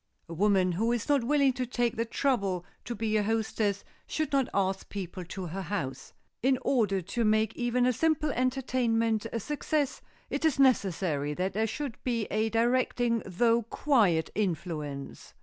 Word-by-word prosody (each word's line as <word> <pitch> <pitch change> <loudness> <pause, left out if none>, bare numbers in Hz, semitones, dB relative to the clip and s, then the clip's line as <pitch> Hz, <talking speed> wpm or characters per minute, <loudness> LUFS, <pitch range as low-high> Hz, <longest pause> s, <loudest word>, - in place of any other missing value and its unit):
A 170 - -7
woman 190 0 +3
who 220 +7 0
is 240 -2 -1
not 285 -4 +3
willing 275 +1 +3
to 250 0 -3
take 240 -1 0
the 230 - -1
trouble 200 -8 0 0.2
to 240 - -4
be 220 0 0
a - - +3
hostess 215 -2 0 0.2
should 310 -1 -2
not 270 -2 +2
ask 190 -1 -1
people 185 -2 -5
to 185 +2 -6
her 180 +4 -4
house. 170 -9 -4 0.3
In 260 +1 +3
order 205 -7 +2
to 235 +7 -2
make 215 0 +2
even 245 0 +1
a 250 - +3
simple 305 +3 +1
entertainment 240 -4 0
a 230 - -2
success 295 +3 -1 0.3
it - - -2
is 315 -4 +3
necessary 180 - +2
that 185 +3 -1
there 220 +2 +1
should 260 +2 -5
be 235 -3 0
a 220 +1 +1
directing 235 0 +1
though 230 +5 +3
quiet 215 - +2
influence. 160 -8 -4
225 Hz, 165 wpm, -29 LUFS, 195-250 Hz, 0.3 s, woman